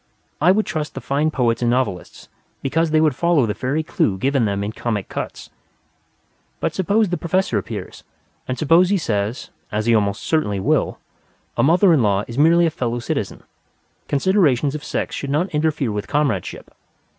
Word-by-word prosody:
I 175 +4 +6
would 215 +3 +2
trust 150 -2 -4
the - - -4
fine 145 +3 0
poets 120 -5 0
and 120 - +2
novelists 120 -8 -2 0.4
because 160 +4 +1
they 155 0 +4
follow 165 -1 +2
the 105 - -1
fairy 130 +8 -2
clue 100 -9 0
given 135 +2 +1
them 100 -1 -1
in 105 - -3
Comic 110 -3 -3
Cuts. - - -6 1.1
But - - -1
suppose 205 +3 +1
the 175 - -1
Professor 185 +3 0
appears, - - -7 0.4
and 130 - -3
suppose 165 +4 +4
he 200 - +3
says 110 - -2 0.2
(as 105 +1 -1
he 115 - +3
almost 105 -1 +1
certainly 105 -12 0
will), - - +1 0.6
"A - - +1
mother 175 +5 +5
in 150 - +3
law 100 -2 +2
is 115 - -7
merely 170 +3 +5
a 165 - +1
fellow 120 -6 -2
citizen. 120 - -4 0.6
Considerations 145 -4 +2
of 150 - -6
sex - - -3
should 140 - -5
not 155 +7 0
interfere 150 -5 0
with 105 +1 -4
comradeship. 140 -11 -2
140 Hz, 175 wpm, -20 LUFS, 115-165 Hz, 1.1 s, I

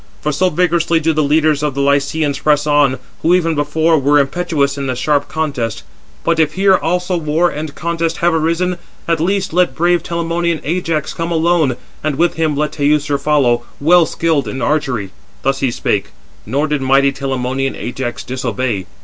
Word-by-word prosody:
For 150 - -1
so 180 +6 +1
vigorously 170 -1 +1
do 160 0 +1
the 155 - +1
leaders 150 0 +2
of 150 -3 -1
the 140 - 0
Lycians 140 +1 +1
press 150 -1 +2
on, 145 -3 +3 0.2
who 175 +2 +4
even 165 -2 +1
before 155 +2 +1
were 145 +2 +3
impetuous 140 -1 0
in 140 -1 -4
the 130 - -1
sharp 145 +3 0
contest. 125 -9 -3 0.4
But 170 -1 +1
if 155 -1 +2
here 190 0 +4
also 180 +2 -1
war 165 +2 +1
and 150 0 -6
contest 165 0 -2
have 175 0 +2
arisen, 170 +3 0 0.3
at 165 -1 +1
least 190 +2 -1
let 175 -6 +2
brave 175 0 +2
Telamonian 170 0 -1
Ajax 165 -2 -2
come 165 +1 -3
alone, 160 -6 +2 0.3
and 155 -2 -1
with 170 +4 +2
him 155 -3 -1
let 150 0 0
Teucer 145 -1 +1
follow, 140 -5 +2 0.2
well 165 +2 +5
skilled 160 -3 0
in 130 - -4
archery." 130 -11 -1 0.3
Thus 135 0 0
he 135 - +1
spake, 105 -4 -1 0.4
nor 140 +7 0
did 150 -2 -1
mighty 135 +1 +3
Telamonian 135 -1 -2
Ajax 120 -1 -5
disobey. 120 -5 -3
150 Hz, 175 wpm, -16 LUFS, 140-165 Hz, 0.4 s, well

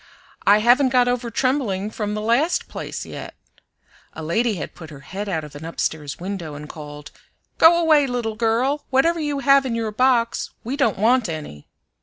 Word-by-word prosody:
"I 205 +1 +6
haven't 250 +4 +5
got 250 -1 +3
over 245 -1 -1
trembling 230 -6 -1
from 210 -1 -3
the 210 - -3
last 245 +10 +1
place - - -6
yet." - - -8 0.8
(A 160 - -7
lady 220 +8 0
had 165 - -6
put 160 -3 -11
her 145 -3 -11
head 200 +8 -6
out 160 -4 -2
of 150 -1 -11
an 145 - -9
upstairs 160 -3 -3
window 175 -5 -5
and 150 +1 -8
called, 150 -1 -10 0.5
"Go 335 +1 +7
away, 310 -4 +4
little 240 -3 -2
girl; 240 +6 0
whatever 330 +6 +2
you 295 -2 -2
have 275 0 +5
in 250 -3 -2
your 225 -2 -2
box 235 0 +1
we 250 +5 -3
don't 275 -7 +1
want 230 +1 +3
any.") 150 - -7
225 Hz, 185 wpm, -22 LUFS, 170-260 Hz, 0.8 s, Go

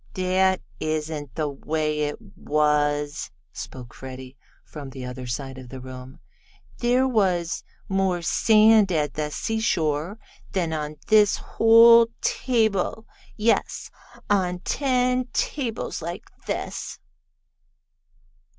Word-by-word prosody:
"That 185 0 +2 0.2
isn't 155 -3 -3
the 155 -2 -1
way 150 +2 -2
it 150 -1 -1 0.2
was," 150 -1 0 0.2
spoke 125 -3 -8
Freddie, 130 0 -9 0.3
from 145 -3 -9
the 130 -1 -8
other 125 0 -7
side 130 +2 -5
of 130 -2 -11
the 130 - -8
room. 130 0 -10 0.6
"There 250 +2 +3
was 185 -8 0 0.2
more 190 -3 0
sand 215 +1 +5
at 150 -5 0
the 150 -1 -2
seashore 170 -3 -1 0.4
than 170 -4 0
on 150 -1 -3
this 210 -2 +5
whole 230 +1 +6
table 220 -3 0 0.3
yes, 225 +1 0 0.4
on 180 -3 +1
ten 255 -1 +1
tables 240 - -2
like 170 +2 -5 0.2
this." - - -4
165 Hz, 105 wpm, -24 LUFS, 145-215 Hz, 0.6 s, whole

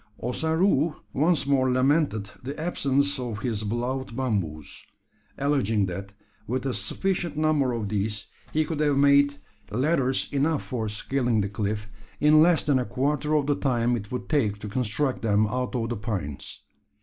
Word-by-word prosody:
Ossaroo 160 - +1 0.2
once 155 +2 +2
more 135 -2 +2
lamented 130 -5 +1
the 140 +4 -6
absence 140 -4 +1
of 115 -4 -4
his 110 -4 -1
beloved 120 +3 -3
bamboos 95 - -3 0.5
alleging 125 -8 +1
that 95 +2 -6 0.4
with 125 +3 -2
a 135 - 0
sufficient 170 - -1
number 155 -4 +2
of 115 -3 -2
these 105 0 -2 0.3
he 155 0 +1
could 155 -1 -4
have 145 -2 +2
made 140 0 +5 0.3
ladders 135 +1 +1
enough 145 +2 +1
for 115 -4 -3
scaling 120 +1 0
the 100 - -2
cliff, 105 +1 -3 0.3
in 150 +1 +6
less 170 0 +4
than 140 -3 +2
a 125 - -1
quarter 145 +5 0
of 145 -2 +2
the 145 - +2
time 120 -3 +1
it 105 -3 -6
would 125 - -4
take 115 -10 +1
to 105 - -7
construct 125 +4 -1
them 110 -1 +3
out 125 +4 -2
of 115 -2 -1
the 120 - -2
pines. 95 - -5
130 Hz, 160 wpm, -26 LUFS, 110-145 Hz, 0.5 s, in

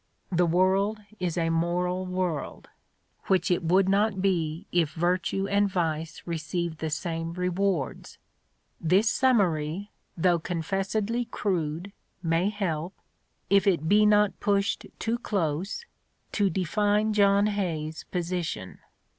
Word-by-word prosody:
The 175 -1 +3
world 190 +5 +2 0.2
is 180 -2 -2
a 165 -1 +1
moral 180 +2 0
world, 180 -5 -3 0.6
which 190 -1 +2
it 175 - +2
would 185 +3 +3
not 200 0 +2
be 170 -4 0
if 165 -4 +1
virtue 185 +3 0
and 200 0 +2
vice 160 -3 -2
received 170 0 -3
the 160 - -2
same 165 +1 -3
rewards. 180 -3 -2 0.6
This 185 +7 +3
summary, 200 - +1 0.3
though 175 0 +3
confessedly 195 +7 -1
crude, 180 -4 -2 0.3
may 165 +3 +2
help, 185 -4 -3 0.5
if 200 +1 +3
it 180 -6 +3
he 210 +1 +6
not 210 -1 +3
pushed 200 0 0
too 230 +1 -1
close, 195 - -2 0.5
to 200 -2 +2
define 205 +4 +1
John 200 -1 +4
Hay's 165 -7 -2
position. 175 - -3
185 Hz, 120 wpm, -27 LUFS, 165-200 Hz, 0.6 s, he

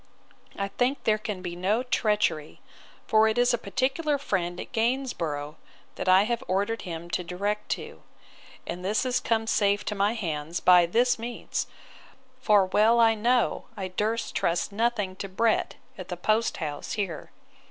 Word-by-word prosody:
I 200 0 -3
think 255 +6 -1
there 215 -1 +2
can 205 -4 -5
be 175 -1 -5
no 200 +7 0
treachery; 210 -11 0 0.5
for 220 0 +4
it 220 +1 0
is 245 0 +4
a - - +2
particular 285 +5 0
friend 180 -9 -2
at - - -7
Gainsborough, 225 - -2 0.4
that - - -3
I 185 +2 +7
have 235 +2 -2
ordered 205 +5 0
him 170 -2 -6
to 180 - -1
direct 200 +5 -3
to; - - -9 0.6
and 175 +1 -5
this 210 +6 0
is 250 -1 +1
come 225 -2 0
safe 205 -2 +1
to - - -2
my 205 +2 +1
hands 165 -5 -3
by 180 -1 +6
this 240 +6 +2
means; 235 +1 -4 0.7
for 210 -6 +4
well 215 +5 +3
I 225 -1 +6
know, 235 +3 +1
I 190 -2 -4
durst 215 +5 -2
trust 170 +3 0
nothing 210 -3 -1
to 195 - -5
Brett, 220 +4 +1 0.2
at 185 - -7
the 180 - -5
post 215 +5 +1
house 150 -3 -4
here. 195 -7 -4
210 Hz, 165 wpm, -27 LUFS, 180-230 Hz, 0.7 s, I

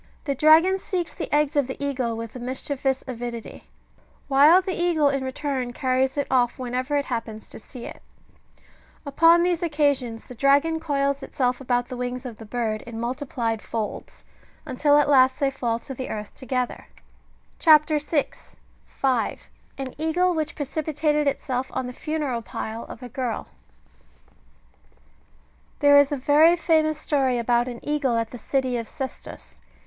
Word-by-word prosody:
The 280 - -1
dragon 320 +7 +5
seeks 360 -3 -3
the - - -6
eggs 295 -1 +2
of 285 -3 +2
the 265 - -6
eagle 255 -5 -2
with 230 +1 -7
a - - -6
mischievous 265 +1 -2
avidity; 240 -2 -7 0.6
while 290 +6 +6
the 375 0 -3
eagle, 340 -5 +2
in 275 -1 -1
return, 260 -2 -3
carries 260 +1 0
it 285 - +1
off 245 -2 +2
whenever 255 +3 -2
it 285 - -1
happens 230 -3 -5
to - - -9
see 240 +2 -10
it; - - -9 1.0
upon 330 +4 +5
these 350 -1 +1
occasions, 285 -8 0
the - - -11
dragon 280 +6 +3
coils 280 -3 -1
itself 250 -1 -1
about 245 -2 0
the 255 - -7
wings 250 +1 -4
of 235 -4 -7
the 225 - -11
bird 220 -2 -2
in 230 -1 -6
multiplied 235 -3 -2
folds, 220 -2 -5 0.4
until 290 +3 +3
at 295 - +3
last 260 -2 +4
they 275 -2 +1
fall 240 -4 -1
to 265 - -9
the 260 0 -6
earth 210 -1 -6
together. 255 -2 -3 0.7
CHAP. 305 -2 +6
6. 295 0 -3 0.3
(5.) 255 -4 -1
— - - -35
AN 270 -1 -5
EAGLE 350 +3 +1
WHICH 315 -1 -2
PRECIPITATED 300 +1 -1
ITSELF 260 -2 -2
ON 260 - -1
THE 250 - -6
FUNERAL 295 -5 -3
PILE 225 0 -6
OF 245 - -10
A 250 - -7
GIRL. 245 -2 -3 2.3
There 285 0 +6
is 285 0 +3
a 290 - 0
very 300 +6 +5
famous 315 -2 +2
story 270 -5 0
about 240 +1 +1
an 240 -2 -6
eagle 285 -5 +1
at 230 -1 -2
the 245 - -8
city 260 +1 -1
of 230 -1 -5
Sestos. 265 +3 -8
270 Hz, 165 wpm, -24 LUFS, 245-295 Hz, 2.3 s, while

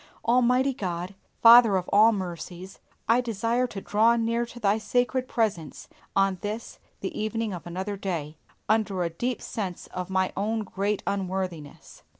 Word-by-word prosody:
Almighty 250 +3 +3
God, 180 -3 -4 0.3
Father 230 -3 +8
of 180 - -3
all 215 +3 +7
mercies, 185 -1 -6 0.3
I 235 +2 +4
desire 235 +2 0
to 210 - -7
draw 225 +4 +3
near 230 0 0
into 240 0 -6
Thy 210 -1 +2
sacred 250 +3 0
presence 205 - -2 0.3
on 195 -1 +2
this 215 +3 -5 0.2
the 340 - -4
evening 215 0 -2
of 175 -1 -8
another 190 +4 -4
day, 165 -6 -4 0.3
under 210 -4 +1
a 170 - -2
deep 240 +8 -3
sense 190 -5 -5
of 180 0 -4
my 190 -1 0
own 220 +3 -1
great 200 +1 -2
unworthiness. 185 -6 -4
205 Hz, 155 wpm, -26 LUFS, 185-230 Hz, 0.3 s, Father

